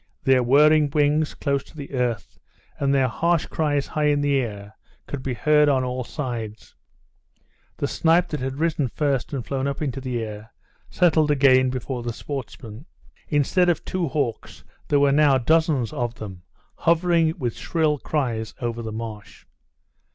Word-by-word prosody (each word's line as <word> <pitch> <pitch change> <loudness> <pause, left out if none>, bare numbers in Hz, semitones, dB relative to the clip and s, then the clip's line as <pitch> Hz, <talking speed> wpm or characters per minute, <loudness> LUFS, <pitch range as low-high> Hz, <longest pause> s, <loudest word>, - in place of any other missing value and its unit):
Their 135 -2 +4
whirring 150 +4 +5
wings 150 +1 +1
close 140 -1 -1
to 160 - -17
the 140 -1 -8
earth, 125 -5 -2 0.4
and 140 -1 +1
their 135 -2 +3
harsh 170 +7 +1
cries 145 -3 -1
high 150 -1 -2
in 145 -1 +2
the 145 -1 +2
air, 105 -4 -5 0.3
could 140 - -6
be 130 -1 -3
heard 150 +5 +4
on 130 -2 +2
all 125 0 -3
sides; 115 -6 -6 1.0
the - - -1
snipe 170 +1 +2
that 150 - -3
had 130 +1 -4
risen 155 -3 0
first 135 -1 -1
and 135 -5 -4
flown 135 0 -2
up 140 - -3
into 135 -3 -3
the 125 -2 -3
air, 105 +1 -8 0.4
settled 160 -4 +3
again 130 -3 +4
before 125 0 -4
the 120 0 -4
sportsmen. 125 - -8 0.4
Instead 165 +5 +2
of 175 - 0
two 180 -3 -2
hawks 135 -5 -3 0.2
there 145 - +3
were 140 0 +4
now 145 -1 +4
dozens 145 -3 +1
of 120 -1 -3
them 95 -5 -9 0.4
hovering 170 -1 +2
with 120 -3 -3
shrill 155 -3 0
cries 115 -8 -2
over 120 -2 -3
the 110 -1 -5
marsh. 110 -2 -8
140 Hz, 165 wpm, -23 LUFS, 120-150 Hz, 1.0 s, whirring